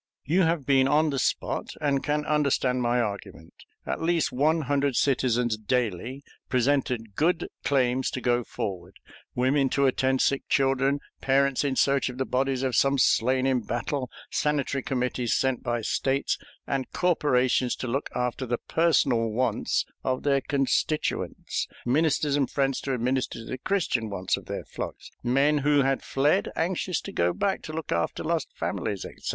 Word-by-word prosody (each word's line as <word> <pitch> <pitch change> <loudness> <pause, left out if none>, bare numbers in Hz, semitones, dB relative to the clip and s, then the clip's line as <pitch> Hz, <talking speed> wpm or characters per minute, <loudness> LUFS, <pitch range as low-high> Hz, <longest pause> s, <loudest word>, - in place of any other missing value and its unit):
You 170 +7 +2
have 165 -5 +1
been 135 -1 +4
on 150 +2 +3
the 135 - -1
spot - - -1
and 140 -3 0
can 150 0 0
understand 140 -4 +1
my 120 0 +2
argument. 100 -7 -5 0.3
At - - -3
least 165 -2 +1
one 155 +6 +2
hundred 140 -2 0
citizens 125 -4 +1
daily 120 +3 -2 0.3
presented 125 -4 0
good 170 +2 +1 0.2
claims 130 -2 +1
to - - -1
go 120 -1 +1
forward 95 -5 -5 0.4
women 135 +2 +2
to 140 +1 +2
attend 130 0 +2
sick 140 - 0
children, 135 +1 +2 0.2
parents 135 0 +2
in 140 -2 0
search 140 0 +2
of 125 - -8
the 130 - -1
bodies 130 0 0
of 130 -3 0
some 135 +1 +3
slain 130 +1 +3
in 130 -2 +2
battle, 125 +4 -3 0.2
sanitary 145 -2 0
committees 125 -2 -1
sent 130 -2 0
by 120 -1 -1
States 135 +5 0 0.3
and 135 -2 -2
corporations 130 -7 +2
to 130 - -5
look 135 +5 -2
after 125 +1 -2
the 120 +1 0
personal 140 -9 +2
wants 125 +4 0 0.2
of 130 0 -1
their 140 -1 +2
constituents, 140 +2 -1 0.2
ministers 145 +2 +2
and 140 -2 +1
friends 135 -2 0
to 135 -2 -2
minister 125 +2 -1
to 115 - -8
the 130 - -5
Christian 130 - 0
wants 95 -2 -1
of - - -11
their - - -5
flocks; - - -7
men 140 +4 +2
who 145 0 +3
had 135 0 +1
fled, 140 +2 +1
anxious 175 0 -1
to - - -7
go 85 +1 +1
back 195 -1 -1
to 155 - -7
look 160 0 -5
after 85 0 -1
lost - - -1
families, 100 -2 -3
etc. - - -11
135 Hz, 165 wpm, -26 LUFS, 125-145 Hz, 0.4 s, been